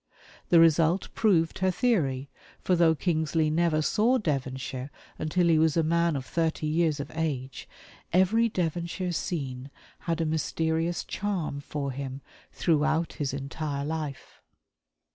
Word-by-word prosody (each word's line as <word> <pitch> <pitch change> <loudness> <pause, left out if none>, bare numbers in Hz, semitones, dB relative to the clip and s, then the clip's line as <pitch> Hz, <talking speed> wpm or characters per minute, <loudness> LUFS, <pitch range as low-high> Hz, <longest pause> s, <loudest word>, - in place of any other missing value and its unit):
The 170 - +6
result 165 +2 +4
proved 175 -7 +2
her 190 0 +2
theory, 155 - 0 0.3
for 185 - +1
though 165 -2 +4
Kingsley 160 -1 0
never 160 -1 +2
saw 230 +9 +3
Devonshire 130 - -3 0.3
until 170 +3 +1
he 160 -2 +4
was 160 0 +3
a 165 - +3
man 170 0 +2
of 135 -2 -4
thirty 160 0 -1
years 155 -1 +1
of 140 +1 -5
age, 140 -5 -3 0.4
every 215 +6 +3
Devonshire 175 0 -2
scene 135 -6 -4 0.3
had 165 -1 -2
a 165 - +1
mysterious 160 +2 -1
charm 185 -8 -3
for 140 -1 -4
him 135 0 -6 0.3
throughout 155 0 +1
his 145 -3 -2
entire 140 +1 -4
life. 150 -3 -5
160 Hz, 135 wpm, -27 LUFS, 145-170 Hz, 0.4 s, The